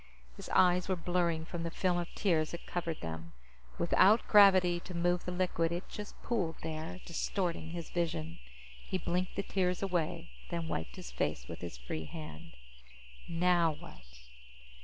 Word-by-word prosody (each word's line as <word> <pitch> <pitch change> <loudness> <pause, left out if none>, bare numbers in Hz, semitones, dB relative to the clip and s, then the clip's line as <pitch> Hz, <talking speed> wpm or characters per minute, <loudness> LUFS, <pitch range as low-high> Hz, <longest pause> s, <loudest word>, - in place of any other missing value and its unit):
His - - -9
eyes 180 0 +4
were 185 - +3
blurring 170 -2 0
from 170 0 -5
the 165 - -2
film 175 +1 +1
of 175 - -4
tears 165 -6 +2
that 170 - -7
covered 170 -2 -3
them; 80 0 -6 0.4
without 200 +6 +5
gravity 190 -4 +7
to 180 +1 -8
move 175 +1 +1
the 180 - -2
liquid, 175 -2 +1
it 175 +1 -3
just 210 -1 -8
pooled 185 -9 0
there, 160 +3 -4
distorting 170 -1 -2
his 170 -1 -6
vision. 85 - -2 0.5
He - - 0
blinked 180 +1 -1
the 200 - -1
tears 180 -1 0
away, 170 -2 -1 0.2
then 170 -2 -2
wiped 80 - -3
his - - -8
face - - -2
with 85 - -7
his 85 -7 -6
free 65 +6 -5
hand. 80 - -8 0.8
Now 170 -1 +3
what? 150 - -12
170 Hz, 160 wpm, -33 LUFS, 160-180 Hz, 0.8 s, gravity